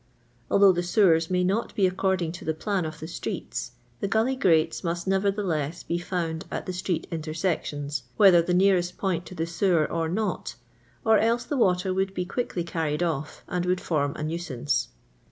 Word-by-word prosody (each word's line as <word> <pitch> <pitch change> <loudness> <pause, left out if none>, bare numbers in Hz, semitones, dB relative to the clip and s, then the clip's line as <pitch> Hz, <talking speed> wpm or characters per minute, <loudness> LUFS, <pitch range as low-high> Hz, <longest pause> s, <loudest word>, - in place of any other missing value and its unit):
Although 200 -1 +6
the 175 -1 0
sewers 175 -3 +3
nay 180 0 +1
not 200 +6 -1
be 200 - +3
according 185 -2 0
to 175 - -9
the 160 - -1
plan 195 +1 -1
of 155 0 -6
the 160 - -6
streets, 120 -6 -5 0.3
the - - -1
gully 225 +6 +1
grates 165 -12 +2
must 170 0 -2
nevertheless 190 -5 0
be 170 - -2
found 170 -3 -3
at - - -4
the 185 - -4
street 180 -1 -2
intersections, 155 -3 -2 0.2
whether 190 -5 +7
the 175 +1 0
nearest 180 -2 +3
point 180 -3 -1
to 185 - -9
the 165 - -1
sewer 170 -1 +2
or 165 0 -2
not, 210 +5 -2 0.5
or 220 -1 +5
else 230 +2 +2
the 290 - -3
water 185 -6 +2
would 190 +1 +1
not 190 - -19
be 180 - -1
quickly 195 -3 -2
carried 165 -1 -1
off, 155 -3 -3
and 180 0 -2
would 180 0 +2
form 145 -5 -1
a - - -5
nuisance. 155 -4 -1
175 Hz, 190 wpm, -26 LUFS, 160-190 Hz, 0.5 s, whether